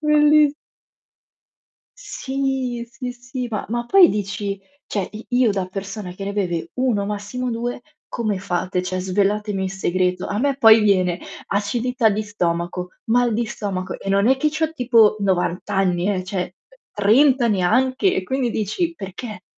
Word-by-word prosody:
bellis 300 Hz, -1 st, +4 dB, 1.4 s
Sì, 265 Hz, -3 st, -3 dB
sì, 250 Hz, 0 st, -6 dB
sì. 245 Hz, +1 st, -6 dB
Ma 215 Hz, -3 st, -3 dB
ma 240 Hz, +2 st, -2 dB
poi 365 Hz, +6 st, +7 dB
dici, 200 Hz, -1 st, -3 dB, 0.3 s
cioè 200 Hz, -3 st, -2 dB
i 215 Hz, +1 st, -8 dB
io 245 Hz, -3 st, +3 dB
da 190 Hz, -2 st, -2 dB
persona 195 Hz, 0 st, -6 dB
che 195 Hz, +2 st, -7 dB
ne 200 Hz, -, -3 dB
beve 180 Hz, -5 st, -2 dB
1 240 Hz, -6 st, 0 dB
massimo 210 Hz, +5 st, -4 dB
2, 240 Hz, +2 st, -4 dB, 0.3 s
come 215 Hz, -5 st, -2 dB
fate? 180 Hz, -1 st, -2 dB
Cioè 185 Hz, 0 st, -3 dB
svelatemi 200 Hz, +2 st, 0 dB
il 190 Hz, -, -2 dB
segreto. 185 Hz, -1 st, 0 dB
A 205 Hz, -, -2 dB
me 280 Hz, -1 st, +1 dB
poi 225 Hz, -4 st, +7 dB
viene: 185 Hz, -4 st, +2 dB, 0.3 s
acidità 230 Hz, +4 st, 0 dB
di 210 Hz, +2 st, -1 dB
stomaco, 175 Hz, -2 st, -2 dB, 0.2 s
mal 240 Hz, +1 st, +2 dB
di 230 Hz, +2 st, 0 dB
stomaco 195 Hz, -4 st, -4 dB
e 195 Hz, -, -7 dB
non 200 Hz, +2 st, +3 dB
è 265 Hz, -, +4 dB
che 305 Hz, +3 st, +1 dB
c'ho 315 Hz, +1 st, -1 dB
tipo 235 Hz, -7 st, +4 dB
90 190 Hz, 0 st, -1 dB
anni, 185 Hz, 0 st, +1 dB
eh, 185 Hz, -2 st, -3 dB
cioè 185 Hz, -2 st, -3 dB, 0.4 s
30 245 Hz, +5 st, +4 dB
neanche, 255 Hz, -, +2 dB
e 185 Hz, -, -2 dB
quindi 260 Hz, +2 st, -1 dB
dici 220 Hz, -, -1 dB
perché? 195 Hz, -, -8 dB
210 Hz, 155 wpm, -21 LUFS, 190-250 Hz, 1.4 s, poi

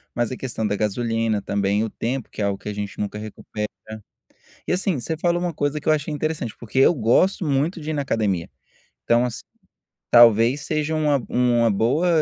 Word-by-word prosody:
mas 120 Hz, 0 st, 0 dB
a 130 Hz, -, -4 dB
questão 115 Hz, -4 st, -4 dB
da 105 Hz, -1 st, 0 dB
gasolina, 115 Hz, 0 st, -1 dB
também, 100 Hz, +1 st, 0 dB
o 110 Hz, -, -2 dB
tempo, 125 Hz, +3 st, -4 dB
que -, -, -7 dB
é -, -, +1 dB
algo 100 Hz, -1 st, -1 dB
que 105 Hz, -, -7 dB
a -, -, -3 dB
gente 100 Hz, -1 st, -6 dB
nunca 105 Hz, 0 st, -3 dB
recupera 105 Hz, 0 st, -6 dB, 1.0 s
e, -, -, +1 dB
assim, 180 Hz, -5 st, 0 dB
você 160 Hz, +7 st, -3 dB
falou 175 Hz, +1 st, +1 dB
uma 175 Hz, -1 st, -2 dB
coisa 145 Hz, +1 st, -1 dB
que 150 Hz, -, -11 dB
eu 155 Hz, -, +6 dB
achei 150 Hz, 0 st, -2 dB
interessante, 150 Hz, -6 st, -3 dB
porque 120 Hz, +3 st, -2 dB
eu 135 Hz, -, +6 dB
gosto 160 Hz, -, +2 dB
muito 150 Hz, +5 st, 0 dB
de 155 Hz, 0 st, -4 dB
ir -, -, -2 dB
na 145 Hz, -, -1 dB
academia, 105 Hz, -10 st, -1 dB, 0.6 s
então, 120 Hz, +1 st, +3 dB
assi 120 Hz, +1 st, -4 dB, 0.7 s
talvez 120 Hz, +3 st, +6 dB
seja 155 Hz, 0 st, -1 dB
uma 150 Hz, -3 st, +2 dB
uma 120 Hz, -1 st, +2 dB
boa 130 Hz, -, +1 dB
120 Hz, 200 wpm, -22 LUFS, 110-150 Hz, 1.0 s, eu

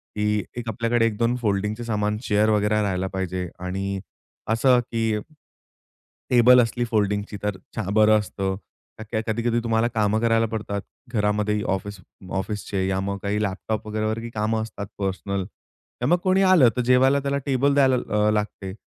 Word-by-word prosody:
की 105 Hz, 0 st, 0 dB, 0.3 s
एक 120 Hz, -1 st, -4 dB
आपल्याकडे 115 Hz, +1 st, +1 dB
एक-दोन 115 Hz, +3 st, 0 dB
फोल्डिंगचे 105 Hz, +2 st, -1 dB
सामान 105 Hz, -1 st, -1 dB
चेअर 105 Hz, +1 st, +3 dB
वगैरे 105 Hz, 0 st, +2 dB
राहायला 95 Hz, -2 st, -1 dB
पाहिजे 95 Hz, -1 st, -3 dB
आणि 95 Hz, +2 st, -3 dB, 0.5 s
असं, 125 Hz, +2 st, +4 dB
की 115 Hz, -3 st, -1 dB, 1.1 s
टेबल 125 Hz, +1 st, +7 dB
असली 120 Hz, +1 st, -2 dB
फोल्डिंगची 105 Hz, -1 st, 0 dB
तर 105 Hz, -2 st, -1 dB, 0.2 s
छा 105 Hz, -4 st, -3 dB
बरं 110 Hz, 0 st, +5 dB
असतं. 95 Hz, -2 st, -3 dB, 0.4 s
का -, -, -5 dB
की 110 Hz, -, +1 dB
कधी-कधी 120 Hz, +1 st, 0 dB
तुम्हाला 115 Hz, 0 st, +2 dB
काम 105 Hz, 0 st, +2 dB
करायला 115 Hz, -1 st, +3 dB
पडतात 100 Hz, -2 st, -3 dB, 0.3 s
घरामध्ये 105 Hz, 0 st, +1 dB
ऑफिस 95 Hz, +1 st, -3 dB, 0.3 s
ऑफिसचे 95 Hz, 0 st, -2 dB
या 95 Hz, 0 st, 0 dB
मग 100 Hz, 0 st, -2 dB
काही 105 Hz, +1 st, -1 dB
लॅपटॉप 105 Hz, +2 st, -3 dB
वगैरेवर 110 Hz, +1 st, -1 dB, 0.2 s
कामं 110 Hz, +1 st, 0 dB
असतात 100 Hz, -2 st, -7 dB
पर्सनल. 100 Hz, 0 st, -2 dB, 0.6 s
तर -, -, 0 dB
मग 175 Hz, -, +4 dB
कोणी 190 Hz, +1 st, +3 dB
आलं 175 Hz, -10 st, +6 dB
तर -, -, +2 dB
जेवायला 130 Hz, +2 st, +4 dB
त्याला 140 Hz, 0 st, -1 dB
टेबल 140 Hz, +1 st, +2 dB
द्यायला 135 Hz, -2 st, +4 dB
अ, 105 Hz, -3 st, +1 dB
लागते. 105 Hz, -3 st, -3 dB
105 Hz, 155 wpm, -24 LUFS, 100-115 Hz, 1.1 s, टेबल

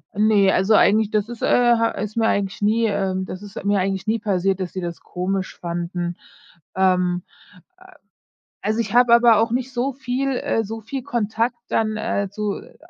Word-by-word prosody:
Ne, 205 Hz, -2 st, +4 dB
also, 190 Hz, +4 st, +2 dB
eigentlich 215 Hz, +1 st, +4 dB
das 215 Hz, -1 st, 0 dB
ist, 240 Hz, -1 st, -8 dB
äh, 240 Hz, -1 st, +4 dB
ha 230 Hz, 0 st, +2 dB
ist 210 Hz, +1 st, -5 dB
mir 225 Hz, -1 st, +2 dB
eigentlich, 200 Hz, -2 st, -1 dB
nie 220 Hz, +3 st, +2 dB
ähm, 190 Hz, -2 st, -1 dB
das 185 Hz, 0 st, -7 dB
ist 205 Hz, -1 st, -8 dB
mir 200 Hz, 0 st, +2 dB
eigentlich 195 Hz, +2 st, -2 dB
nie 225 Hz, +1 st, +1 dB
passiert, 195 Hz, -2 st, 0 dB
dass 185 Hz, -2 st, -4 dB
sie 185 Hz, -, -4 dB
das 170 Hz, -1 st, -6 dB
komisch 185 Hz, +1 st, -3 dB
fanden. 175 Hz, 0 st, -3 dB, 0.6 s
Ähm, 180 Hz, -1 st, +2 dB, 1.2 s
äh, -, -, -11 dB
also, 215 Hz, +2 st, 0 dB
ich 220 Hz, -3 st, -2 dB
habe 245 Hz, -1 st, +6 dB
aber 235 Hz, -1 st, +6 dB
auch 225 Hz, +1 st, +1 dB
nicht 255 Hz, +2 st, -2 dB
so 255 Hz, +2 st, -1 dB
viel 265 Hz, +1 st, -2 dB
äh, 225 Hz, -, 0 dB
soviel 225 Hz, +5 st, -6 dB
Kontakt 230 Hz, +1 st, -1 dB
dann, 215 Hz, -1 st, 0 dB
äh, 200 Hz, -2 st, -1 dB
zu, 210 Hz, -1 st, -2 dB
äh, -, -, -16 dB
210 Hz, 185 wpm, -22 LUFS, 190-230 Hz, 1.2 s, habe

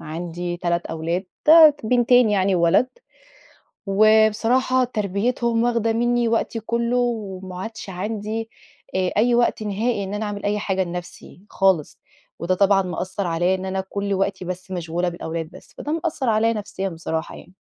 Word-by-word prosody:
عندي 175 Hz, +2 st, -5 dB
3 170 Hz, 0 st, -1 dB
أولاد 165 Hz, +4 st, -3 dB, 0.2 s
ت -, -, +4 dB, 0.4 s
بِنتين 245 Hz, -1 st, +4 dB
يعني 195 Hz, -1 st, +2 dB
وولد، 175 Hz, +9 st, +3 dB, 1.0 s
وبصراحة 220 Hz, +5 st, +3 dB
تربيتهم 230 Hz, +2 st, -1 dB
واخدة 230 Hz, -2 st, +1 dB
مِنّي 240 Hz, 0 st, +1 dB
وقتي 225 Hz, 0 st, -1 dB
كلّه، 235 Hz, +2 st, -1 dB
وما 195 Hz, -6 st, -3 dB
عادش 220 Hz, -2 st, -7 dB
عندي 215 Hz, +4 st, -4 dB, 0.4 s
آآ، 185 Hz, -1 st, 0 dB
أي 235 Hz, +3 st, +3 dB
وقت 235 Hz, -2 st, +2 dB
نهائي 210 Hz, +1 st, -1 dB
إن 195 Hz, -, -5 dB
أنا 215 Hz, +1 st, -2 dB
أعمل 205 Hz, -1 st, -5 dB
أي 205 Hz, +1 st, 0 dB
حاجة 190 Hz, -2 st, -1 dB
لنَفسي 175 Hz, +1 st, -9 dB
خالص، 190 Hz, -6 st, +1 dB, 0.4 s
وده 180 Hz, +2 st, 0 dB
طبعًا 195 Hz, 0 st, +3 dB
مأثر 185 Hz, +1 st, -4 dB
عليَّ 175 Hz, +3 st, +1 dB
إن 190 Hz, 0 st, -4 dB
أنا 190 Hz, 0 st, -2 dB
كل 200 Hz, 0 st, -2 dB
وقتي 195 Hz, -1 st, -1 dB
بس 185 Hz, +1 st, -6 dB
مشغولة 175 Hz, 0 st, -2 dB
بالأولاد 165 Hz, -1 st, -5 dB
بس، -, -, -16 dB
فده 295 Hz, -, -4 dB
مأثر 300 Hz, -6 st, -1 dB
عليَّ 220 Hz, +1 st, +2 dB
نفسيًا 200 Hz, -3 st, -4 dB
بصراحة 160 Hz, 0 st, -4 dB
يعني. 180 Hz, -, -15 dB
200 Hz, 155 wpm, -22 LUFS, 180-225 Hz, 1.0 s, ت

